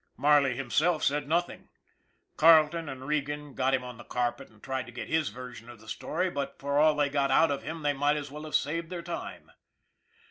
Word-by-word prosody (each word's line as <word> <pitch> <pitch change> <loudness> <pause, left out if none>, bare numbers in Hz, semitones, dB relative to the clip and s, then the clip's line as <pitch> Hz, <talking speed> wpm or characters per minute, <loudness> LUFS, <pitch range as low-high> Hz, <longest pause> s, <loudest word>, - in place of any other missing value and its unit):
Marley 145 -3 +4
himself 150 +6 +1
said 145 0 +1
nothing. 170 +3 -1 0.7
Carleton 160 0 +5
and 130 -1 -7
Regan 150 -1 -2
got 130 +1 +2
him 125 - -3
on 125 -2 -8
the - - -9
carpet 120 0 -2
and 110 -1 -23
tried 130 -1 -3
to - - -10
get 120 - -6
his 160 -2 +1
version 125 -2 -10
of 120 -2 -12
the 110 - -17
story, 185 +10 -2
but 140 -2 -4
for 140 +1 0
all 155 0 +5
they 145 -1 +2
got 140 -1 0
out 165 - +4
of 140 - -2
him 160 0 -6
they 145 0 +2
might 145 +2 +1
as 145 -2 -6
well 150 +1 -8
have 155 - -3
saved 165 +3 -1
their 175 -2 -5
time. 170 0 -7
145 Hz, 215 wpm, -29 LUFS, 130-155 Hz, 0.7 s, Carleton